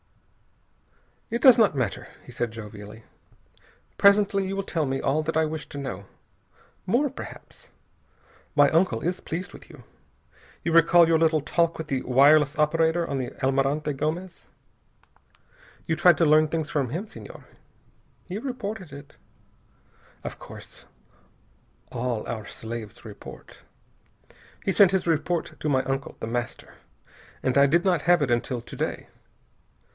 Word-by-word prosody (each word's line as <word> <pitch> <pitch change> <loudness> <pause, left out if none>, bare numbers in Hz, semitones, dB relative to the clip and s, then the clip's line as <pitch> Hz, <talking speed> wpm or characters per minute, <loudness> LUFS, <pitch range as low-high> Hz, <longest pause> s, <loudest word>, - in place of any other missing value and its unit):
"It 235 +1 -2
does 255 -3 +8
not 210 -9 +4
matter," 120 -8 -2 0.2
he - - -12
said 120 - -2
jovially. 105 0 -10 0.9
"Presently 200 -1 +4
you 195 - -3
will 195 - -2
tell 165 -5 -1
me 135 0 -2
all 145 +3 +1
that 160 +1 -2
I 160 - +3
wish 155 -2 -5
to - - -8
know. 130 -7 -5 0.8
More, 255 +9 +2
perhaps. 270 - -11 0.9
My 145 -1 +6
uncle 165 -8 +2
is 180 +2 -2
pleased 180 +3 -5
with - - -13
you. - - -14 0.8
You 170 - -1
recall 165 +1 +6
your 165 -1 +3
little 160 -1 +3
talk 170 +3 0
with 160 - -6
the 135 -3 -1
wireless 145 +3 +4
operator 160 +2 +2
on 140 -1 -2
the 125 -2 -3
Almirante 135 +3 +1
Gomez? 170 +6 -4 1.4
You 160 - 0
tried 175 +1 +5
to 165 - +3
learn 155 +1 +5
things 160 -2 -2
from 140 -5 -1
him, 175 - -4
Senhor. - - -12 0.8
He 185 +1 -5
reported 220 - -5
it. 140 0 -12 1.1
Of - - -5
course. - - -11 1.1
All 120 -2 -3
our 110 -2 -5
slaves 110 0 -8
report. - - -12 1.0
He 190 - +1
sent 200 -4 +6
his 190 -2 0
report 165 +1 -1
to 155 - -2
my 130 -2 +2
uncle, 135 0 -4
The - - -5
Master, 120 +1 -4 0.7
and 130 +1 +1
I 140 0 +6
did 170 +6 +2
not 180 -5 +2
have 175 0 +4
it 130 - -1
until 120 +1 -1
to - - -11
day. - - -3
155 Hz, 150 wpm, -25 LUFS, 135-175 Hz, 1.4 s, does